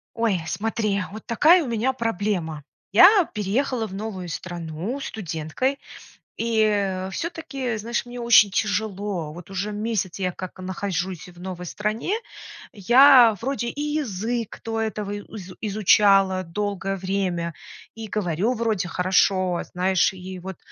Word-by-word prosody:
Ой, 225 -6 +1
смотри, 210 +1 -1
вот 215 +2 -9
такая 320 +9 +5
у - - -5
меня 235 +3 0
проблема. 200 - -2 0.3
Я 365 - +8
переехала 225 +3 -1
в 190 - -11
новую 195 -3 -5
страну 175 - -5
студенткой, 215 - -3 0.6
и 205 -5 +1
всё-таки, 275 - -4
знаешь, 230 +4 -2
мне 245 0 -8
очень 235 -3 +6
тяжело. 200 -4 -2
Вот 175 +2 -11
уже 195 +2 -3
месяц 210 -3 -2
я 185 -1 0
как 185 +1 -8
нахожусь 185 -1 -4
в 175 -1 -16
новой 180 -1 -6
стране, 215 - -2 0.6
я 240 +2 +7
вроде 260 -1 -2
и 285 - -8
язык 240 -7 -2
до 225 0 -2
этого 210 -2 -3
и 205 - -4 0.2
изу 185 -2 -9
изучала 195 -2 +4
долгое 195 +2 -3
время, 185 -3 -2 0.4
и 225 -1 -7
говорю 200 +2 0
вроде 220 -6 -1
хорошо, 185 0 +2
знаешь, 185 +1 +2
и 185 0 -8
вот 190 0 -7
205 Hz, 135 wpm, -24 LUFS, 185-230 Hz, 0.6 s, Я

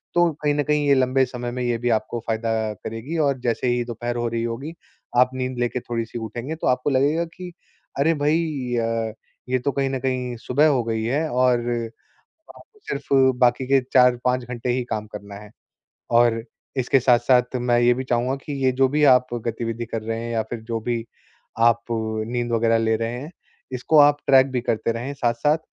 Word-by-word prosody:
तो 175 -1 +4
कहीं 145 -1 +2
न 145 - +1
कहीं 150 0 +1
ये 140 - +5
लंबे 130 0 +3
समय 120 -1 -5
में 125 +1 -4
ये 120 -1 0
भी 120 +1 -1
आपको 110 +2 -6
फ़ायदा 115 0 -1 0.3
करेगी 115 +9 -5
और 140 -2 0
जैसे 120 0 -1
ही 120 0 +1
दोपहर 120 0 -4
हो 120 0 -1
रही 115 0 -2
होगी, 120 +7 -4 0.4
आप 125 +1 +5
नींद 130 -1 -3
लेके 120 +1 -1
थोड़ी-सी 115 -1 -4
उठेंगे 120 +7 -5
तो 160 - -3
आपको 125 +2 +1
लगेगा 145 +6 +2
कि 180 -1 -7 0.5
अरे, 160 +4 +3
भई 150 +3 +2 0.4
य 115 -1 -1 0.4
ये 130 - +2
तो 140 +3 -1
कहीं 135 -1 0
न 135 -1 -2
कहीं 125 -2 -2
सुबह 135 +6 +2
हो 135 -5 +2
गई 110 -1 -2
है 140 +8 0
और 125 -1 +3 1.0
आप - - -14 0.3
सिर्फ़ - - -4 0.3
बाकी 125 +1 +3
के 135 0 +4
4-5 125 0 +3
घंटे 120 0 -5
ही 125 +1 0
काम 110 -1 -2
करना 100 -1 -9
है। 105 +1 -11 0.6
और 115 -1 +4 0.4
इसके 130 +1 +2
साथ-साथ 125 +1 +3
मैं 120 -1 +1
ये 120 0 +5
भी 130 +2 -4
चाहूँगा 125 +2 0
कि 150 - -4
ये 130 - +5
जो 135 - +5
भी 150 +3 0
आप 125 -2 +6 0.2
गतिविधि 115 0 -3
कर 115 -1 -4
रहे 115 +1 -3
हैं 115 0 -5
या 115 -1 +1
फिर 120 - -4
जो 115 - 0
भी 115 -2 -1 0.6
आप 115 0 +2
नींद 115 +2 -2
वग़ैरह 115 0 +3
ले 110 0 +1
रहे 115 +1 -3
हैं, 150 +4 -8 0.4
इसको 130 +5 +2
आप 145 0 +5
ट्रैक 135 -1 +7
भी 125 - 0
करते 115 -1 0
रहें 120 +5 -5
साथ-साथ 130 +4 +1
125 Hz, 200 wpm, -23 LUFS, 115-135 Hz, 1.0 s, ट्रैक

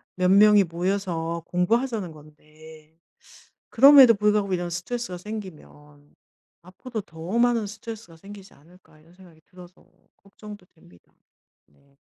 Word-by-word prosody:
몇 180 0 0
명이 205 0 +5
모여서 170 -2 -4
공부하자는 215 +1 -2
건데 155 +1 -18 0.7
그럼에도 270 -2 +7
불구하고 210 -1 0
이런 175 -1 -3
스트레스가 185 +3 -6
생기면 150 -8 -12 0.5
앞으로도 215 +5 -9
더 170 +6 -6
많은 235 -3 +1
스트레스가 215 -4 -11
생기지 195 +2 -14
않을까.' 160 +1 -23
이런 165 +2 -24
생각이 175 -4 -20
들어서 180 0 -18 0.3
걱정도 205 -1 -14
됩니다. 90 - -25 0.5
네. 140 0 -32
185 Hz, 320 characters per minute, -23 LUFS, 160-210 Hz, 0.7 s, 그럼에도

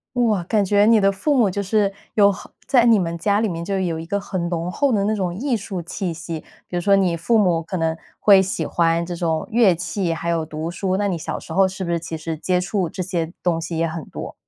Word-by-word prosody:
哇， 220 -7 +2
感 210 0 +1
觉 205 +2 +4
你 225 -1 +6
的 195 0 +3
父 280 +9 0
母 220 -6 +3
就 200 - -2
是 200 0 +1 0.2
有 200 -1 +6
好 190 - -10 0.2
在 245 -4 +4
你 230 -2 +6
们 170 -3 -1
家 205 +4 +1
里 225 - +1
面 170 -3 -4
就 195 +2 -2
有 170 -4 -1
一 165 - -7
个 200 +3 -1
很 185 -4 -3
浓 170 +1 -2
厚 280 +5 +1
的 205 -4 +2
那 215 - +1
种 185 -4 -2
艺 255 +4 -1
术 195 -4 -5
气 180 +2 -4
息， 165 0 -6 0.3
比 - - -6
如 175 - 0
说 200 +2 +4
你 185 -3 +2
父 195 +8 +1
母 180 -6 +3
可 180 +3 -5
能 160 -1 0 0.2
会 195 -2 +6
喜 190 - -2
欢 170 0 +1
这 175 - -5
种 165 -2 -1
乐 220 -6 +4
器， 175 +1 -2
还 170 +1 -4
有 165 -1 0
读 155 +1 -5
书。 185 +1 -1
那 205 - 0
你 190 - -1
小 160 - -4
时 160 - -9
候 190 +2 +4
是 190 0 -6
不 170 - -2
是 170 - 0
其 165 0 -6
实 160 +1 -4
接 180 +3 0
触 180 -1 -1
这 185 - -4
些 170 -3 -2
东 165 -2 +1
西 165 0 -4
也 165 - +1
很 165 -1 -5
多？ - - -8
185 Hz, 285 characters per minute, -21 LUFS, 170-200 Hz, 0.3 s, 你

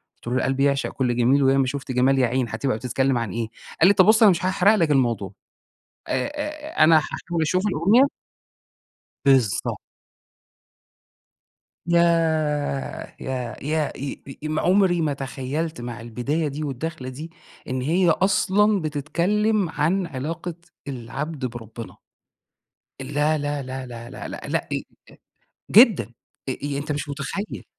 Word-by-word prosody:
قلتُ - - -17
له: 125 - -1
"القلب 135 +1 0
يعشق 140 0 +2
كل 125 -3 -1
جميل، 135 +4 +3
وياما 135 0 +4
شُفت 135 0 -4
جمال 130 +2 +3
يا 125 - +4
عين 125 -1 -1
هاتبقى 115 +1 -1
بتتكلّم 130 +2 0
عن 115 -5 -2
إيه؟" 115 -1 -2 0.3
قال 175 - +8
لي: 200 - +6
"طَب، 185 -2 +5
بُص 220 +1 +5
أنا 205 - +8
مش 180 +1 -1
هأحرق 190 +3 +4
لك 165 -6 +2
الموضوع." 115 -8 +1 0.8
آآ، 130 - 0
آآ، 300 - -1
أنا 160 0 +7
هاحاول 165 +1 -3
أشوف 185 +6 +1
الأغنية. 200 - +4 1.2
بالضبط. 130 -8 +2 2.1
ياه! 160 -5 +1
يا 125 -3 -4
يا 155 0 0
أ 140 +1 -5
أ - - -6
أم 155 0 -1
عمري 180 -2 +3
ما 150 -2 0
تخيلت 135 +2 -4
مع 120 -1 -6
البداية 130 +7 -2
دي 145 +2 -4
والدخلة 140 0 -4
دي، 155 +6 -8 0.4
إن 130 0 -2
هي 170 +6 +2
أصلًا 200 +2 +3
بتتكلّم 175 +7 0
عن 170 +5 0
علاقة 160 +5 -5 0.3
العبد 135 +3 -5
بربنا. 115 -1 -8 1.1
لأ، 150 +3 0
لأ، 145 0 -2
لأ، 130 0 -6
لأ، 120 -1 -9
لأ، - - -7
لأ، - - -8
لأ، - - -1
إ - - 0
إ - - +1
إ - - -6 0.9
جدًا. 220 - +7 0.5
أ - - +1
أ 140 +2 -4
أنت 150 +2 -4
مش 145 0 -3
متخيل. 155 +9 -5
145 Hz, 150 wpm, -23 LUFS, 130-170 Hz, 2.1 s, قال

